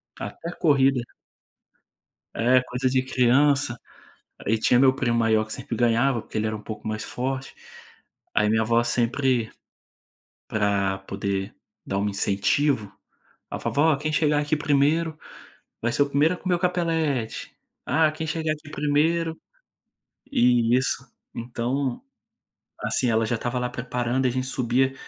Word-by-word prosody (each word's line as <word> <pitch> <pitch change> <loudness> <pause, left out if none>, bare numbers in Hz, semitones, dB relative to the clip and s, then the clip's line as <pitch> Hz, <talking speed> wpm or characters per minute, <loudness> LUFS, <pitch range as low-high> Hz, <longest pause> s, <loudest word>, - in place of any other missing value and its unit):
Ca - - -6
até 165 +11 -7
corrida. 135 -4 +3 1.3
É 125 +2 +4
coisa 125 +1 -1
de 130 0 +1
criança. 130 0 +2 0.7
Aí 110 +2 +2
tinha 120 - +4
meu 130 0 +5
primo 120 -3 0
maior 110 -1 +3
que 110 - -7
sempre - - -5
ganhava, 120 +1 +2
porque - - -7
ele 110 - 0
era 110 - -2
um 105 - -8
pouco 105 0 -8
mais 110 0 -3
forte. 130 +2 -4 0.8
Aí 105 0 +3
minha 110 0 +3
avó 115 +1 +2
sempre, 120 0 +1 1.0
pra 100 -2 0
poder 100 0 -3 0.3
dar 95 - -2
um 105 +1 0
incentivo, 105 +4 +1 0.6
a - - -4
vovó 155 +1 +2
quem 155 +2 -2
chegar 150 -1 +2
aqui 150 +1 0
primeiro 150 +3 +1 0.6
vai 120 - 0
ser - - +1
o 140 - -5
primeiro 150 +5 +3
a - - -12
comer 180 -1 0
o - - -3
capelete. 165 -9 -1 0.3
Ah 155 +2 +3
quem 160 +1 -5
chegar 160 -1 -1
aqui 150 -1 -11
primeiro 160 +3 +1 0.9
e 120 -1 +4
isso, 130 0 -1 0.3
então, 120 +2 -2 0.8
assim 125 - 0
ela 110 0 +2
já 120 - 0
estava 120 +2 -2
lá 125 - -1
preparando 125 +1 -2
e - - +4
a - - -2
gente 130 +1 -2
subia 130 +1 +1
125 Hz, 150 wpm, -25 LUFS, 115-145 Hz, 1.3 s, meu